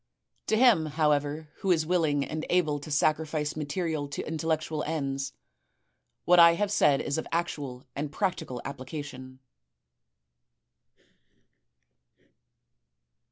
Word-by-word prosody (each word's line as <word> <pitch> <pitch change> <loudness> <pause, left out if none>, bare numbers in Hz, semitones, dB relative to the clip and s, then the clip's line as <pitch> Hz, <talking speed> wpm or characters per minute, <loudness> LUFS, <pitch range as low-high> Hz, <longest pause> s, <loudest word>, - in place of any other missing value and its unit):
To 220 - +2
him, 225 -10 +5
however, 150 0 0
who 195 - -3
is 165 -3 +3
willing 155 -5 +1
and 155 0 -4
able 155 -5 +2
to 145 - -10
sacrifice 150 0 0
material 155 0 -2
to 140 - -5
intellectual 160 -1 -1
ends, 135 -4 -3 0.9
what 175 0 +6
I 170 0 +8
have 205 +2 -1
said 140 -8 +3
is 145 +2 -1
of - - -6
actual 145 -7 -3
and 145 0 -3
practical 160 - -2
application." 130 -1 -7
155 Hz, 110 wpm, -28 LUFS, 145-165 Hz, 0.9 s, I